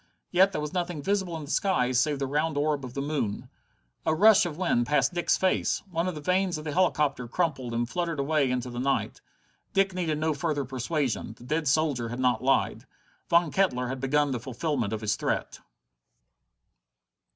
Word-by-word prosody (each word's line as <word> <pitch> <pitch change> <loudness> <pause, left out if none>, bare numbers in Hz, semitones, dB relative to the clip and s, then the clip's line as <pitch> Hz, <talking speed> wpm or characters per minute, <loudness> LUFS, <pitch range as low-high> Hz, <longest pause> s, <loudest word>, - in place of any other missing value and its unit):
Yet 190 +2 +5
there 170 - -3
was 150 +1 -5
nothing 175 -5 -2
visible 190 -3 -1
in 155 - -7
the 145 - -7
skies 130 -11 +2
save 145 +2 +1
the 135 - -2
round 150 +2 -1
orb 145 -1 0
of 125 -1 -8
the 140 - -2
moon. 140 -9 -3 0.5
A 160 - +1
rush 210 +1 +6
of 155 -3 -7
wind 145 -10 +1
past 145 +1 +2
Dick's 175 0 +1
face! 190 - +1
One 165 +1 0
of 180 - -3
the 150 - -6
vanes 185 +1 +1
of 155 - -7
the 150 - -4
helicopter 150 -7 +1
crumpled 135 -4 -1
and 120 0 -1
fluttered 170 +1 -2
away 140 -1 +1
into 125 0 -2
the 120 - -5
night. 135 +2 -1 0.5
Dick 195 0 +2
needed 170 -4 -1
no 155 +1 0
further 145 -2 -2
persuasion. 130 -2 -2
The - - -14
dead 155 +4 -1
soldier 140 -5 +1
had 120 +2 -5
not 125 -3 +2
lied. 135 +1 +1 0.4
Von 170 -2 +4
Kettler 125 -11 +1
had 130 0 -4
begun 145 +1 +2
the 125 - -2
fulfillment 125 -2 -2
of 110 -1 -3
his 105 -1 0
threat! - - -2
150 Hz, 195 wpm, -27 LUFS, 130-170 Hz, 0.5 s, rush